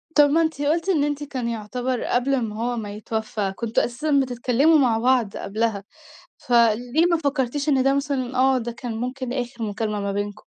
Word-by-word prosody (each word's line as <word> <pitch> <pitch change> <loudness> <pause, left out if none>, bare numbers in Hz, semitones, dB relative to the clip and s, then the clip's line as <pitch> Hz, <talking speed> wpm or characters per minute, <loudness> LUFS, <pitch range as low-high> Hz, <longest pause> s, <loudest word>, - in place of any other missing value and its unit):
طَب 290 -1 +6
ما 320 +3 +3
أنتِ 320 -3 -1
قُلتِ، 325 +5 0
إن 315 -7 +3
أنتِ 290 0 -2
كان 260 -4 -4
يُعتبر 245 +3 -3
قبل 255 +3 0
امّا 225 -5 -1
هو 240 +2 -2
ما 205 -3 -5
يتوفى، 215 -2 -3
كنتم 230 +1 0
أساسًا 280 +4 0
بتتكلموا 255 +5 +2
مع 250 -6 +3
بعض 245 -3 +1
قبلها، 215 0 -2 0.6
فليه 240 +6 +2
ما 340 - +4
فكرتيش 280 -1 -1
إن 270 -3 +3
ده 270 +1 +3
مثلًا 270 -2 -2
آه، 265 0 +4
ده 240 0 -4
كان 235 -1 -6
مُمكن 255 0 -4
آخر 245 -2 -4
مُكالمة 210 0 -2
ما 200 0 -2
بينكم؟ 205 +1 -4
245 Hz, 185 wpm, -23 LUFS, 225-280 Hz, 0.6 s, طَب